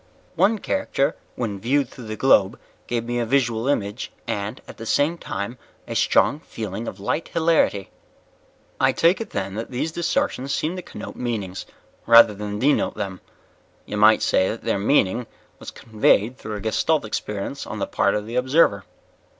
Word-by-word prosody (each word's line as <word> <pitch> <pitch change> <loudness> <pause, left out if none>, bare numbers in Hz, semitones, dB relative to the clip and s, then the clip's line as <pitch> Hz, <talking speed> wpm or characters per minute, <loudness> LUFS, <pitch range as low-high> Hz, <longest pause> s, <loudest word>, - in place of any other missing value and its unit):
"One 200 +6 +3
character 195 - -1 0.2
when 105 -5 -3
viewed 135 +6 +1
through 120 -3 -11
the 110 - -4
globe 110 -4 +3 0.3
gave 120 -1 -1
me 120 0 -2
a 120 - 0
visual 120 -2 +1
image 105 -4 -1
and, 105 +3 -3
at - - -11
the 115 - -8
same 145 +8 +2
time, 100 +6 -5 0.3
a - - -4
strong 145 - +3
feeling 110 - -6
of 95 - -6
light 150 +11 -2
hilarity." 160 - +1 0.9
"I - - +3
take 170 +6 +3
it 225 - -5
then 95 0 -3
that 110 +3 -5
these 130 +6 -2
distortions 170 - -1
seemed 165 +4 -2
to - - -4
connote - - -9
meanings, 105 -6 -4 0.4
rather 115 -2 +8
than 105 0 -5
denote 140 +6 +2
them. 95 -2 -5 0.6
You 105 - -5
might 105 +1 +5
say 95 - +2
that 110 - -5
their 100 - 0
meaning 110 0 +2 0.3
was - - -8
conveyed 110 +1 +1
through 110 -4 -6
a 105 - -6
Gestalt 110 +7 +1
experience 105 +4 -4
on 110 - -5
the 100 - -1
part 100 -1 +1
of 105 0 -2
the 115 +3 -4
observer." 125 - +3
115 Hz, 175 wpm, -23 LUFS, 105-140 Hz, 0.9 s, rather